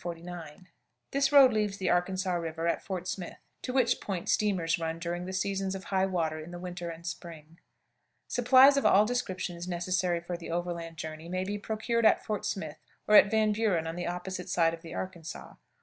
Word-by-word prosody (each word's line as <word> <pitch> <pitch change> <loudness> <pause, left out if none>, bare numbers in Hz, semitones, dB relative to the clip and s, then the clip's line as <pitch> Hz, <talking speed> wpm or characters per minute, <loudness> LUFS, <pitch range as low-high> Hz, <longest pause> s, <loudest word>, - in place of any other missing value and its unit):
This 275 0 +2
road 275 -4 +8
leaves 210 -2 0
the 190 -2 0
Arkansas 185 +1 0
River 165 -1 -2
at 170 - 0
Fort 185 -2 -5
Smith, 180 -1 -5 0.2
to 255 - -4
which 250 -2 +2
point 190 -4 -4
steamers 180 -6 +1
run 165 0 -2
during 175 +1 -4
the - - -4
seasons 195 0 -1
of 190 - -7
high 190 -1 +1
water 165 -4 -1
in 155 +2 -9
the 175 - -7
winter 175 -1 -6
and 165 0 -9
spring. 165 -1 -8 0.7
Supplies 260 +3 +6
of 275 - +1
all 205 +2 +6
descriptions 185 -7 -3
necessary 180 0 0
for 175 +1 -5
the 170 - -9
overland 170 -1 -4
journey 160 +1 -7
may 185 +1 -1
be 205 +2 -3
procured 220 +2 +1
at - - +2
Fort 210 -2 -2
Smith, 160 -6 -4 0.3
or 210 - +2
at 200 - +8
Van 220 0 +2
Buren 205 -6 +1
on 165 0 -4
the 175 - -3
opposite 180 +1 -5
side 165 -2 +2
of 165 - -8
the 165 - -9
Arkansas. 170 -3 -7
180 Hz, 195 wpm, -29 LUFS, 170-205 Hz, 0.7 s, road